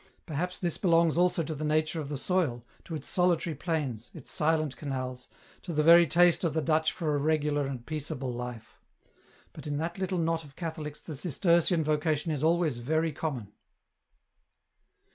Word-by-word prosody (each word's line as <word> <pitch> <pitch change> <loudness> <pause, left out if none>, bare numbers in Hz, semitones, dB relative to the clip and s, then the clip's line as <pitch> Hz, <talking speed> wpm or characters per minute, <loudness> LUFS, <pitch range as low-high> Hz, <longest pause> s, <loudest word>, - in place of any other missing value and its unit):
Perhaps 180 +3 -3
this 175 -3 -1
belongs 170 -3 +3
also 175 -1 +2
to 160 - -4
the 155 0 -5
nature 155 +1 +1
of 140 - -6
the 145 - -3
soil, 140 -7 0 0.2
to 165 - -5
its 155 - -7
solitary 180 -2 +1
plains, 140 - -3
its - - -9
silent 155 -2 +1
canals, 130 -3 -5 0.3
to 175 - -6
the 150 0 +2
very 170 +1 +8
taste 175 +4 +4
of 165 -3 0
the 160 - +2
Dutch 160 0 +2
for 155 -4 -2
a 145 - +1
regular 150 -1 +1
and 130 -3 -6
peaceable 145 -4 -4
life; 120 -2 -7 0.7
but 155 -1 -9
in 145 -1 -2
that 170 +4 -3
little 190 -1 -1
knot 165 -1 0
of 140 -2 -15
Catholics 155 -3 -5
the 155 - -7
Cistercian 170 +2 +2
vocation 155 +1 0
is 150 -1 -2
always 160 -6 +2
very 160 +6 0
common." 135 -9 -4
155 Hz, 175 wpm, -29 LUFS, 145-170 Hz, 0.7 s, very